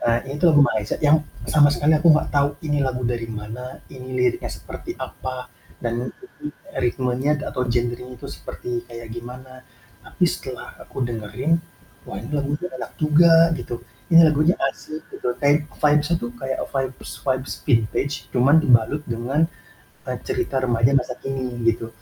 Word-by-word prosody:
Eee, 120 0 +2
ini 145 - -6
tuh 175 - +6
lagu 145 - +8
Malaysia 110 -6 -1
yang 155 +1 +4 0.2
sama 145 -1 +6
sekali 150 +2 +3
aku 170 - +4
gak - - -1
tau 140 0 +4 0.2
ini 145 -1 +1
lagu 125 -1 -1
dari 120 -1 -2
mana, 110 +4 -7
ini 130 -1 -9
liriknya 125 -1 +1
seperti - - -8
apa 130 -1 -5 0.4
dan 120 +1 -2 0.3
e 300 - -5
i - - -3 0.3
ritmenya 130 +4 +1
atau 125 - -1
genrenya 120 +1 -1
itu - - -8
seperti 120 -1 -5
kayak 115 -1 -9
gimana, 130 +2 -9 0.4
tapi - - -1
setelah - - -5
aku - - -5
dengerin, 120 +6 -1 0.5
wah - - -6
ini 115 +6 -8
lagunya 145 +4 -1
enak - - -6
juga 165 +2 +6
gitu 120 - -5 0.4
ini 165 - +10
lagunya 155 +3 +3
asik 155 +3 -7
gitu 125 - -1
kayak 145 +1 +4 0.2
vibes-nya 150 +2 +3
itu 120 - -3
kayak 130 +2 -3
vibes 135 -1 -3
vibes 130 0 -1
vintage 125 +2 +1 0.2
cuman 135 +5 +5
dibalut 125 +1 +4
dengan, 120 +5 -1 0.7
eee, - - -2
cerita 365 - 0
remaja 120 0 +3
masa 125 0 -5
kini 130 -3 -4
gitu, 115 0 -2
130 Hz, 160 wpm, -23 LUFS, 120-145 Hz, 0.7 s, ini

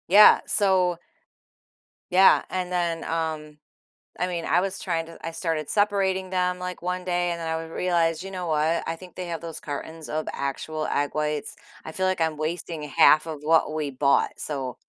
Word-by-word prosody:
Yeah. 205 +4 +8
So 185 -4 +2 1.1
Yeah, 190 +2 +6
and 180 -1 -3
then, 170 -2 -1
um 155 -2 -3 0.6
I 180 - +2
mean, 175 -2 -3
I 175 - +3
was 195 +1 -2
trying 165 -3 -2
to 165 - -12
I 165 - -3
started 160 -3 -2
separating 195 -2 +1
them, 180 -1 0
like, 180 0 -5
one 180 +1 -3
day 175 -1 0
and 170 - -4
then 160 -1 -2
would 165 0 -6
I - - -10
realize, 170 -2 +1
"You 195 - -7
know 180 -2 -4
what? 160 +1 +1
I 165 - -2
think 180 0 -13
they 180 -1 -5
have 165 -1 -4
those 165 -2 -6
cartons 155 +2 -6
of 155 0 -2
actual 155 +3 -3
egg 145 0 0
whites." 150 -1 -2 0.3
I - - -6
feel 185 - 0
like 185 -1 0
I'm 160 -1 +1
wasting 160 0 -4
1/2 155 +1 +5
of 155 -2 -5
what 160 0 +3
we 155 -2 -2
bought. 140 +1 +2
So 135 -4 -4
165 Hz, 195 wpm, -25 LUFS, 155-180 Hz, 1.1 s, Yeah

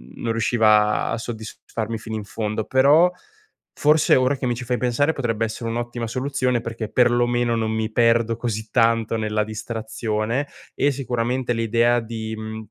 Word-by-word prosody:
non 115 - -3
riusciva 110 -2 +3
a - - -1
soddisfarmi 110 0 -5
fino 110 0 -6
in 110 - -4
fondo. 110 +1 -3
Però, 145 +7 +5 0.6
forse 150 +1 +4
ora 130 +2 +2
che 130 - -4
mi 120 - 0
ci 125 - -6
fai 125 0 0
pensare, 125 +5 +1
potrebbe 115 -5 -1
essere 115 +1 -5
un'ottima 120 0 -3
soluzione 130 -1 -1
perché 115 -2 -5
perlomeno 120 0 +2
non 110 -1 -1
mi 110 0 -2
perdo 115 0 +3
così 110 -2 -4
tanto 115 -1 +2
nella 110 -1 0
distrazione, 110 +3 -3 0.3
e 145 - +2
sicuramente 125 -1 -2
l'idea 115 +1 +2
di, 110 -1 -5
mhmm 110 0 -7
115 Hz, 155 wpm, -22 LUFS, 110-120 Hz, 0.6 s, Però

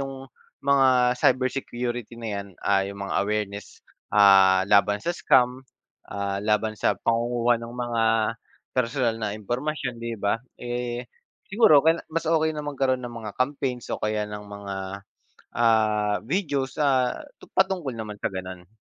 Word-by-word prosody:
yung 135 -1 -6 0.4
mga 130 -3 +4
cybersecurity 125 -2 0
na 115 - -4
yan, - - -14 0.2
ah, 100 -1 +3
yung 100 0 -6
mga - - -4
awareness, 100 -1 -4 0.3
ah, 95 -2 +6
laban 105 0 +4
sa 175 - 0
scam, 125 -6 +3 0.5
ah, 100 -1 -2
laban 110 +1 +1
sa - - +1
pangunguha 120 0 +1
ng 115 0 -8
mga 120 -2 -1 0.7
personal 125 -2 +1
na 105 -2 -2
impormasyon, 125 +3 -3
'di 115 0 -4
ba? 100 +3 0 0.2
Eh, 120 0 -3 0.4
siguro 195 -8 +6
okey 160 +1 +5
na - - -15
mas 165 0 -1
okey 160 -1 +2
na 150 - -4
magkaroon 135 -3 0
ng 120 - -6
mga 105 -2 -6
campaigns 130 -2 -2
o - - -2
kaya 105 0 0
ng 105 0 -7
mga, 100 -1 -7 0.8
ah, 110 -3 +3
videos, 140 - -1
ah, 130 -3 +2 0.2
tu - - -14
patungkol 190 -8 0
naman 105 -2 -6
sa - - 0
ganun. 90 -1 -7
120 Hz, 150 wpm, -25 LUFS, 105-130 Hz, 0.8 s, ah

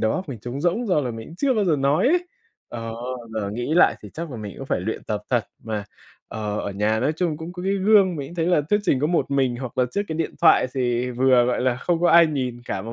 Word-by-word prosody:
đầu 110 - +1
óc 185 -2 -4
mình 130 -5 -6
trống 125 +5 -5
rỗng 180 +8 0
do 180 -6 +2
là 125 -4 -2
mình 115 -1 -8
cũng 165 - -12
chưa 270 +3 +1
bao 215 -3 +1
giờ 165 -5 +2
nói 140 - +2
ấy. 355 +3 +2 0.4
Ờ, 115 -1 -6 0.4
giờ 100 -2 -2
nghĩ 120 +8 -2
lại 175 - +5
thì - - -9
chắc 165 0 -5
là 125 - -6
mình 105 -2 -7
cũng 135 - -7
phải - - -1
luyện 110 +5 -4
tập 105 -1 -3
thật 120 -3 +2 0.2
mà. 110 -2 -3 0.4
Ờ, 105 -1 -4
ở - - -4
nhà 105 +3 0
nói 145 +6 +1
chung 160 -2 -1
cũng 160 +2 -7
có 180 0 -7
cái 195 +1 0
gương, 195 -2 +4
mình 140 -2 -5
cũng 175 - -10
thấy 165 -1 -1
là 175 -4 +3
thuyết 205 - +4
trình 135 -10 +1
có 150 - +2
một 170 -2 0
mình 135 -3 +1
hoặc 130 0 -7
là 125 - +4
trước 200 - -1
cái 160 - -3
điện 165 - -2
thoại - - +6
thì 125 -1 0
vừa, 125 0 +4
gọi 125 0 0
là, 125 -1 +1
không 165 +6 -1
có 175 - +4
ai 170 0 +7
nhìn 130 -5 -3
cả 95 - -4
mà 115 +2 -7
135 Hz, 290 wpm, -23 LUFS, 120-170 Hz, 0.4 s, ai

